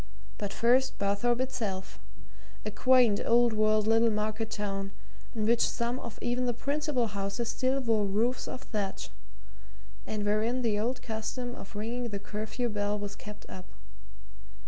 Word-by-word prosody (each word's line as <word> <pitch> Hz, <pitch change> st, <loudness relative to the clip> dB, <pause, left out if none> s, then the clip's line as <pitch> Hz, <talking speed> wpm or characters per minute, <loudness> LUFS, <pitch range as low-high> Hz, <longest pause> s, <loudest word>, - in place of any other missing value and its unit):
But 205 Hz, -1 st, -2 dB
first 250 Hz, +4 st, +3 dB
Barthorpe 205 Hz, +5 st, +1 dB
itself 220 Hz, -8 st, -3 dB, 0.7 s
a 215 Hz, -, -2 dB
quaint 245 Hz, -2 st, +5 dB
old 235 Hz, 0 st, +4 dB
world 215 Hz, 0 st, +3 dB
little 225 Hz, +1 st, +5 dB
market 215 Hz, +1 st, -1 dB
town, 195 Hz, -2 st, -3 dB, 0.5 s
in 215 Hz, -2 st, 0 dB
which 235 Hz, +1 st, +4 dB
some 235 Hz, +2 st, 0 dB
of 235 Hz, -4 st, -7 dB
even 245 Hz, +1 st, +1 dB
the 240 Hz, -, 0 dB
principal 285 Hz, -1 st, 0 dB
houses 200 Hz, +2 st, -2 dB
still 260 Hz, +3 st, +1 dB
wore 225 Hz, -4 st, +2 dB
roofs 230 Hz, +6 st, 0 dB
of 255 Hz, -, -6 dB
thatch, 205 Hz, -6 st, -3 dB, 1.0 s
and 210 Hz, -1 st, -2 dB
wherein 220 Hz, +5 st, +1 dB
the 215 Hz, -3 st, +2 dB
old 245 Hz, +4 st, -1 dB
custom 240 Hz, +2 st, -3 dB
of 200 Hz, -2 st, -10 dB
ringing 235 Hz, +3 st, -2 dB
the 205 Hz, -, -3 dB
curfew 215 Hz, +4 st, -3 dB
bell 205 Hz, -1 st, -1 dB
was 205 Hz, 0 st, -5 dB
kept 210 Hz, 0 st, -10 dB
up. 185 Hz, 0 st, -9 dB
220 Hz, 150 wpm, -30 LUFS, 210-245 Hz, 1.0 s, quaint